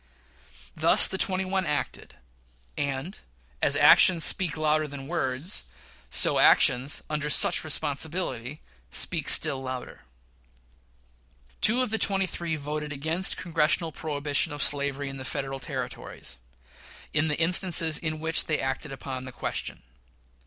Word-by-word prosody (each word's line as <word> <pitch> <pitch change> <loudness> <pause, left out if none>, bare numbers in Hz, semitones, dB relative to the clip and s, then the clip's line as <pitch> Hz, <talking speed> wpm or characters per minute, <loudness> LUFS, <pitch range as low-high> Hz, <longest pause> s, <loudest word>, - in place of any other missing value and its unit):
Thus - - +5
the 190 - -5
twenty 190 0 +3
one 190 0 -2
acted; 150 -3 -5 0.6
and, 140 +6 -5 0.4
as 140 - +2
actions 160 +3 +6
speak 175 -5 +2
louder 155 0 0
than 140 -1 -9
words, 155 +1 -3 0.5
so - - +5
actions 130 +3 +3
under 150 -1 -4
such - - +3
responsibilities 145 -3 -3 0.3
speak - - 0
still 135 - +3
louder. 130 -1 -8 1.6
Two 245 +4 +5
of 250 - -5
the 220 - -2
twenty 195 -1 +2
three 170 -2 -4
voted 150 0 -6
against 160 +6 +1
Congressional 165 -1 0
prohibition 145 0 -2
of 145 - -2
slavery 140 -1 0
in 135 0 -7
the 130 - -8
Federal 135 -1 -5
Territories, 125 - -6 0.7
in 155 +1 0
the 150 - -2
instances 165 -1 +2
in 155 -1 -5
which 160 +1 +2
they 155 - -2
acted 135 +2 -4
upon 130 -1 -7
the 130 - -9
question. - - -6
150 Hz, 130 wpm, -25 LUFS, 140-165 Hz, 1.6 s, actions